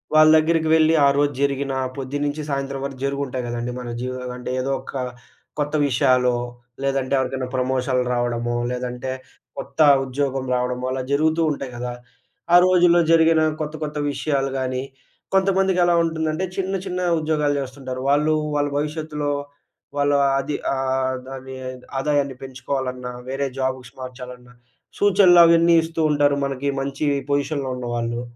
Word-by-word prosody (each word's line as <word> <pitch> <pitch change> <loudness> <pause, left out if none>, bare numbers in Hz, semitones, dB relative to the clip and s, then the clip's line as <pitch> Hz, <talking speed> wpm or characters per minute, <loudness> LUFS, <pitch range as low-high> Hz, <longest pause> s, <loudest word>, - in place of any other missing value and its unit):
వాళ్ళ 155 0 +7
దగ్గరికి 160 0 +2
వెళ్లి 160 0 +4
ఆ - - +6
రోజు 145 0 +2
జరిగిన 140 -1 0 0.2
పొద్దున్నించి 145 +3 -3
సాయంత్రం 140 -1 -3
వరకు 135 -2 -7
జరిగుంటాయి 140 -2 -2
గదండీ 120 +1 -3
మన 125 -1 -6
జీవ్ 130 +1 -4 0.2
అంటే 125 - -6
ఏదో 135 +2 -1
ఒక - - -10 0.7
కొత్త 145 +1 -1
విషయాలో, 125 -1 +3 0.5
లేదంటే 135 -1 0
ఎవరికైనా 130 0 -2
ప్రమోషన్లు 130 0 0
రావడమో, 120 -1 -1 0.2
లేదంటే 125 +1 -4 0.5
కొత్త 140 +2 -8 0.3
ఉద్యోగం 135 0 -2
రావడమో 125 0 -2
అలా 130 0 -2
జరుగుతూ 155 +3 +2
ఉంటాయి 135 -2 -6
గదా! 125 0 -4 0.6
ఆ - - +9
రోజుల్లో 175 -1 +5
జరిగిన 165 -1 +5 0.2
కొత్త 155 0 -4
కొత్త 150 0 -4
విషయాలు 140 -1 -1
గానీ, 130 0 -2 0.5
కొంతమందికి 190 -1 +2
ఎలా 175 - +3
ఉంటుందంటే, 160 +1 -1
చిన్న 195 0 -1
చిన్న 180 -1 -3 0.2
ఉద్యోగాలు 150 -2 0
జేస్తుంటారు. 130 -1 -6
వాళ్ళూ 150 +2 +3 0.2
వాళ్ళ 145 0 +1
భవిష్యత్తులో 150 -1 -2 0.7
వాళ్ళ 145 0 +2 0.3
అది 145 +2 -3 0.2
ఆహ్, 130 -1 0 0.2
అది 130 0 -9 0.4
ఆదాయాన్ని 140 -1 0
పెంచుకోవాలన్నా 130 -1 -4 0.2
వేరే 135 +1 -2
జాబ్స్‌కి 130 -2 -3
మార్చాలన్న 125 -1 -9 0.5
సూచనలవన్నీ 175 -4 +6
ఇస్తూ 165 0 -3
ఉంటారు. 145 -1 +3
మనకి 135 0 -3
మంచి 140 +2 -3 0.3
పొజిషన్‌లో 140 -1 -1
ఉన్నవాళ్ళు. 120 -1 -3
140 Hz, 135 wpm, -22 LUFS, 130-155 Hz, 0.7 s, ఆ